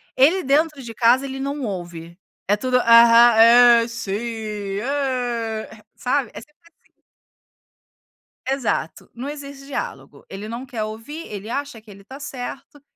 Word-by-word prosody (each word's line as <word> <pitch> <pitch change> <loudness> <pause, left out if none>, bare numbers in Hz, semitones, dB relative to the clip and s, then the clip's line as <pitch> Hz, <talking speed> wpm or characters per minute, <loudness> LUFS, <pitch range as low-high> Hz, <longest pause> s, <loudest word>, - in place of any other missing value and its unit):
ele 325 +9 +4
dentro 300 +1 +1
de 235 -3 -8
casa 245 +4 +3
ele 270 0 -6
não 280 +1 -4
ouve, 170 -4 -7 0.3
é 205 - +3
tudo, 255 +4 0
aham, 235 0 +7 0.5
é, - - -5
sim, 230 -4 -5 0.7
é, 240 -5 -3
sabe, 255 -2 -1
é - - -8
sempre 300 +6 -19 0.3
assim. - - -32 1.6
Exato, 260 - -2
não 250 +4 -7
exige 280 -2 -9
diálogo, 285 - -7
ele 200 +2 -7
não 235 +4 -6
quer 240 -5 -5
ouvir, 225 +10 -7
ele 205 +1 -8
acha 280 -2 -5
que 215 - -20
ele 200 0 -14
está 260 +8 -12
certo, 275 +1 -8
245 Hz, 145 wpm, -21 LUFS, 220-275 Hz, 1.6 s, aham